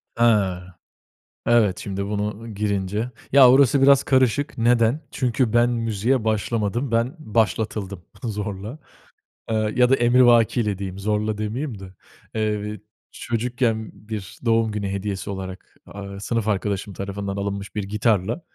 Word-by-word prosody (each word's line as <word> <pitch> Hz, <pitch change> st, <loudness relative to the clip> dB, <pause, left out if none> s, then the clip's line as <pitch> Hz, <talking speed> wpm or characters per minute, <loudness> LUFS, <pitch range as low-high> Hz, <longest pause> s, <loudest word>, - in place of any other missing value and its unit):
Ha! 100 Hz, -6 st, +2 dB, 0.8 s
Evet. 110 Hz, -6 st, +3 dB
Şimdi 100 Hz, 0 st, -4 dB
bunu 105 Hz, +2 st, -3 dB
girince. 105 Hz, +3 st, -2 dB, 0.2 s
Ya, 135 Hz, -2 st, +8 dB
orası 135 Hz, 0 st, +5 dB
biraz 140 Hz, 0 st, +6 dB
karışık. 130 Hz, +2 st, +1 dB
Neden? 120 Hz, +4 st, +3 dB
Çünkü 125 Hz, -2 st, 0 dB
ben 120 Hz, +1 st, +4 dB
müziğe 115 Hz, +1 st, 0 dB
başlamadım, 110 Hz, +3 st, -1 dB
ben 115 Hz, +5 st, +1 dB
başlatıldım 105 Hz, -, -1 dB, 0.2 s
zorla. 105 Hz, +3 st, -5 dB, 0.7 s
Iıı 110 Hz, -1 st, 0 dB
ya 125 Hz, 0 st, +4 dB
da 135 Hz, -, +5 dB
emrivakiyle, 120 Hz, -4 st, +4 dB
diyeyim; 95 Hz, -1 st, -6 dB
zorla, 105 Hz, +1 st, -1 dB
demeyeyim 110 Hz, +2 st, -4 dB
de. 95 Hz, -1 st, -11 dB, 0.4 s
Eee, 105 Hz, -1 st, -2 dB, 0.3 s
çocukken 120 Hz, -1 st, -2 dB
bir 105 Hz, -2 st, -8 dB
doğum 115 Hz, -1 st, +2 dB
günü 105 Hz, -2 st, -3 dB
hediyesi 100 Hz, 0 st, -4 dB
olarak, 95 Hz, -1 st, -7 dB
aaa, 100 Hz, 0 st, -8 dB
sınıf 110 Hz, +1 st, -2 dB
arkadaşım 100 Hz, 0 st, -1 dB
tarafından 100 Hz, 0 st, -4 dB
alınmış 100 Hz, 0 st, -4 dB
bir 105 Hz, -, -1 dB
gitarla 105 Hz, -, 0 dB
110 Hz, 125 wpm, -23 LUFS, 100-120 Hz, 0.8 s, Ya